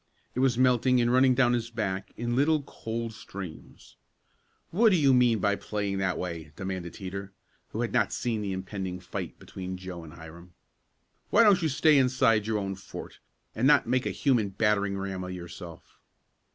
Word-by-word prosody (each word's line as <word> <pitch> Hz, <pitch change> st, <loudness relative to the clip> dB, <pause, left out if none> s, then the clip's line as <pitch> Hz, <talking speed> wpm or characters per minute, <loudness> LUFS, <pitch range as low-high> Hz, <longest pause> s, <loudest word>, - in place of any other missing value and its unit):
It -, -, -3 dB
was 130 Hz, -2 st, +3 dB
melting 125 Hz, 0 st, +4 dB
and 120 Hz, 0 st, +2 dB
running 130 Hz, 0 st, +5 dB
down 120 Hz, -1 st, +4 dB
his 115 Hz, -1 st, -1 dB
back 105 Hz, -5 st, -3 dB
in 120 Hz, 0 st, -2 dB
little 150 Hz, +2 st, +3 dB
cold 115 Hz, -3 st, -5 dB
streams. 95 Hz, -6 st, -10 dB, 0.7 s
"What 225 Hz, +6 st, +5 dB
do 195 Hz, -, +4 dB
you 140 Hz, -5 st, +4 dB
mean 125 Hz, -2 st, +4 dB
by 100 Hz, 0 st, +1 dB
playing 100 Hz, -2 st, -3 dB
that 95 Hz, -2 st, 0 dB
way?" 85 Hz, -4 st, -5 dB
demanded 95 Hz, -3 st, -5 dB
Teeter, 100 Hz, 0 st, -6 dB, 0.3 s
who -, -, -4 dB
had -, -, -2 dB
not -, -, +2 dB
seen 115 Hz, -3 st, -2 dB
the 100 Hz, -2 st, -3 dB
impending 95 Hz, -1 st, -4 dB
fight 90 Hz, -, -6 dB
between 95 Hz, 0 st, -7 dB
Joe 90 Hz, -2 st, -8 dB
and 80 Hz, -1 st, -11 dB
Hiram. 85 Hz, +1 st, -13 dB, 0.7 s
"Why 230 Hz, -, +6 dB
don't 200 Hz, -4 st, +5 dB
you 160 Hz, -, +1 dB
stay 150 Hz, +1 st, +4 dB
inside 125 Hz, -5 st, +3 dB
your 110 Hz, -1 st, 0 dB
own 100 Hz, -1 st, -2 dB
fort, 95 Hz, -, -10 dB, 0.3 s
and 125 Hz, +4 st, +1 dB
not 150 Hz, -, +5 dB
make 125 Hz, +2 st, 0 dB
a -, -, 0 dB
human 120 Hz, -8 st, +1 dB
battering 100 Hz, -1 st, +1 dB
ram 95 Hz, -1 st, -4 dB
of 90 Hz, 0 st, -5 dB
yourself?" 85 Hz, -1 st, -10 dB
105 Hz, 180 wpm, -28 LUFS, 95-125 Hz, 0.7 s, Why